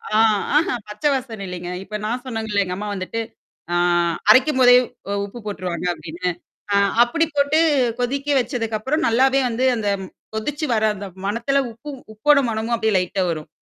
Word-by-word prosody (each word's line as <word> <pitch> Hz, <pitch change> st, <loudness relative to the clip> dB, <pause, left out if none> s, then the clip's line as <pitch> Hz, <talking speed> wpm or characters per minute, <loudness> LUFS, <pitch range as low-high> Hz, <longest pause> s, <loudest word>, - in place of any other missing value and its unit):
ஆ -, -, +5 dB, 0.4 s
ஆஹா 305 Hz, -5 st, +1 dB
பச்சை 210 Hz, +8 st, -1 dB
வாசனை 230 Hz, -6 st, -5 dB
இலைங்க. 175 Hz, -1 st, -6 dB
இப்ப 210 Hz, +2 st, -5 dB
நான் 245 Hz, +3 st, -2 dB
சொன்னேங்கள்ல 220 Hz, -4 st, -1 dB
எங்க 180 Hz, -, -4 dB
அம்மா 210 Hz, +1 st, -5 dB
வந்துட்டு. 200 Hz, +4 st, -4 dB, 0.5 s
ஆ -, -, +2 dB, 0.5 s
அரைக்கும்போதே 255 Hz, +1 st, +6 dB, 0.3 s
உ -, -, -2 dB
உப்பு 205 Hz, +4 st, -10 dB
போட்டுருவாங்க 180 Hz, -4 st, -4 dB
அப்படின்னு. 170 Hz, +2 st, -4 dB, 0.4 s
அ -, -, +4 dB, 0.3 s
அப்படி 325 Hz, +8 st, +1 dB
போட்டு 285 Hz, +2 st, +3 dB, 0.4 s
கொதிக்க 275 Hz, +3 st, -2 dB
வச்சதுக்கப்புறம் 245 Hz, +4 st, -1 dB
நல்லாவே 265 Hz, +4 st, +3 dB
வந்து 240 Hz, +3 st, 0 dB
அந்த 215 Hz, -2 st, -3 dB, 0.5 s
கொதிச்சு 290 Hz, +8 st, -2 dB
வர 220 Hz, -1 st, +1 dB
அந்த 200 Hz, 0 st, -7 dB, 0.2 s
மணத்தில, 235 Hz, +7 st, 0 dB
உப்பு 235 Hz, +7 st, -11 dB, 0.2 s
உப்போட 285 Hz, +7 st, +4 dB
மணமும் 225 Hz, +1 st, -1 dB
அப்படியே 220 Hz, -1 st, 0 dB
லைட்டா 185 Hz, +1 st, 0 dB
வரும். 155 Hz, -2 st, -4 dB
225 Hz, 155 wpm, -21 LUFS, 205-260 Hz, 0.5 s, அரைக்கும்போதே